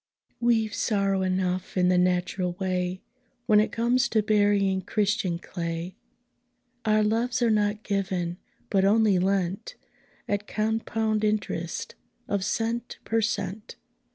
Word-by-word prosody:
We've 225 -3 +2
sorrow 195 -2 +1
enough 185 0 -1
in 180 0 +4
the 180 - +3
natural 180 0 0
way, 185 -1 -2 0.4
When 210 -2 +5
it 215 - +1
comes 245 +3 +2
to 215 -2 +2
burying 205 -2 +2
Christian 205 -2 0
clay. 170 0 -5 0.9
Our 215 0 +3
loves 235 +3 +1
are 230 - +3
not 210 0 +1
given, 185 -3 -2 0.3
but 195 -2 +3
only 205 -1 +4
lent, 195 - -1 0.5
At 205 0 -2
compound 220 0 -1
interest 205 -5 -2 0.3
of 200 -1 -1
cent 230 +4 -2
per 225 0 +1
cent. 205 0 -3
205 Hz, 125 wpm, -26 LUFS, 185-220 Hz, 0.9 s, When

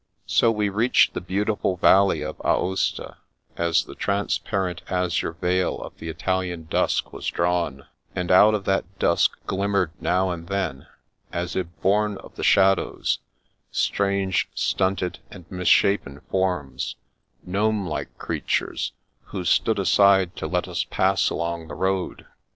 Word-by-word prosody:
So 115 - +3
we 105 -2 +1
reached 110 +6 +3
the - - -4
beautiful 100 0 -1
valley 95 -4 +4
of 75 0 -6
Aosta, 95 +1 0 0.4
as 85 -1 +2
the - - -10
transparent 95 -2 -1
azure 90 -3 0
veil 90 +2 0
of - - -9
the 80 - -6
Italian 90 0 -2
dusk - - 0
was - - -6
drawn, 85 -6 -1 0.3
and 90 0 -1
out 105 +4 +7
of 100 -2 -4
that 95 0 -1
dusk 85 - +2
glimmered 100 -3 0
now 95 0 +1
and 85 -1 -6
then, 95 -9 -3 0.4
as 85 0 -3
if 90 -2 -1 0.2
bom 105 +1 +2
of - - -13
the - - -7
shadows, 95 -1 +3 0.5
strange, 100 -2 0
stunted, 95 -1 0
and 90 - -12
misshapen 90 -5 +2
forms, 90 -8 -1 0.5
gnome 105 +2 0
like 75 - -5
creatures, - - -2 0.3
who 95 - -5
stood 110 +5 +2
iaside 95 -2 +4
to - - -5
let - - -1
us - - -1
pass - - +1
along 85 -1 -3
the - - -7
road. 95 -1 -2
95 Hz, 140 wpm, -24 LUFS, 85-100 Hz, 0.5 s, out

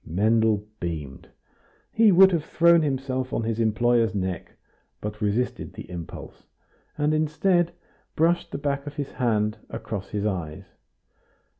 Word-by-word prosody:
Mendel 105 +4 +2
beamed. 80 -6 -6 0.6
He 220 -2 +5
would 190 +1 +7
have 165 -4 0
thrown 170 +1 +4
himself 130 -3 -2
on 115 - 0
his 115 0 -2
employer's 115 0 +2
neck, 95 -3 -3 0.5
but 105 +1 -6
resisted 105 +4 -1
the - - -9
impulse, 85 -2 -9 0.5
and, 150 +1 +1
instead, 165 +3 +2 0.4
brushed 170 +2 +2
the - - -3
back 140 0 -2
of 145 - -7
his 145 -2 -4
hand 110 -4 0
across 100 -3 -6
his 105 -1 -2
eyes. 85 -7 -3
115 Hz, 135 wpm, -25 LUFS, 105-150 Hz, 0.6 s, would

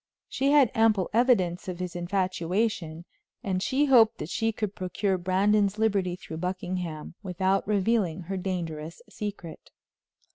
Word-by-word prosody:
She 275 +1 0
had 285 -4 +5
ample 220 -5 +2
evidence 195 -8 +2
of 180 -2 -4
his 180 -1 -5
infatuation, 175 -1 -1 0.4
and 190 -4 -1
she 270 +8 +2
hoped 240 -5 +5
that 150 - -6
she 225 0 0
could 210 -2 -3
procure 190 +2 -1
Brandon's 195 +3 +2
liberty 200 -5 +1
through 160 -3 -9
Buckingham 180 -3 -4
without 190 0 0
revealing 200 -4 +1
her 185 +3 -5
dangerous 170 -4 -4
secret. 205 -6 -7
190 Hz, 135 wpm, -27 LUFS, 175-215 Hz, 0.4 s, had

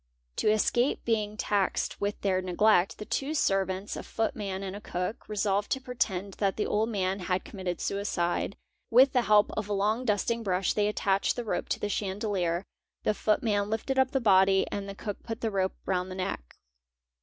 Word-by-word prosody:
'To - - +2
escape 240 +4 +2
being 215 -2 0
taxed 200 -3 0
with 205 0 -1
their 190 -2 +1
neglect, 185 +1 +3
the 210 - -7
two 280 +7 -2
servants, 195 - 0
a - - -4
footman 205 -3 -3
and 190 0 -5
a 205 - -7
cook, 180 +3 -4
resolved 205 -1 0
to 265 - +1
pretend 200 -7 -2
that 195 -2 +1
the 210 - 0
old 220 +2 +1
man 195 -2 -1
had 180 0 -1
commit 190 -3 -8
ted 175 -1 -1
suicide; 200 -2 -1 0.3
with 260 +3 +6
the 250 - +4
help 210 -2 +4
of 210 -1 -4
a - - 0
long 210 +5 +1
dusting 230 +1 0
brush 185 -3 0
they 210 -1 +2
attached 200 -2 +1
the 245 - -4
rope - - -2
to - - -1
the - - -1
chandelier, 195 -3 -1 0.4
the 215 - +2
footman 210 -1 +1
lifted 245 +5 -1
up 260 -1 +4
the 270 - 0
body 195 -4 +5
and 200 0 -4
the 195 - -6
cook 205 0 -5
put 225 0 -6
the 225 - 0
rope 190 -1 0
round 185 -1 -1
the 185 - -6
neck. 185 - -4
205 Hz, 195 wpm, -29 LUFS, 190-220 Hz, 0.4 s, with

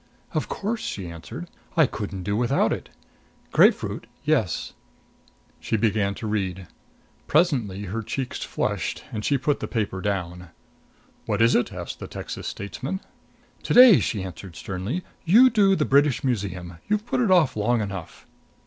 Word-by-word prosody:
"Of - - -1
course!" 220 +3 -2
she 95 -3 -4
answered. 115 - -8 0.3
"I 160 - +7
couldn't 100 -6 -5
do 100 +2 -1
without 120 +2 +2
it. - - -6 0.6
Grapefruit - - +3 0.2
yes." - - 0 0.9
She 110 - -1
began 105 -2 +1
to 110 - -7
read. 95 -3 -2 0.6
Presently 125 - +2
her 105 +4 -3
cheeks 130 +3 -4
flushed - - -2
and 105 -1 -4
she 140 - +2
put 140 +2 0
the - - -4
paper 100 -5 -2
down. 90 -3 -3 0.8
"What - - 0
is 115 +1 +5
it?" 120 - +2
asked 90 -3 -6
the - - -6
Texas - - -6
statesman. 130 - -4 0.6
"To - - -1
day," 245 -7 +10
she 105 -5 -2
answered 95 -1 -8
sternly, 100 - -4 0.2
"you 235 +9 +7
do 200 -3 +4
the 150 - +1
British 140 -1 +3
Museum. 95 -9 -3
You've 210 +1 +1
put 250 - 0
it 230 - +2
off 175 -7 +4
long 115 +3 +1
enough." 100 -5 -6
110 Hz, 155 wpm, -24 LUFS, 95-150 Hz, 0.9 s, day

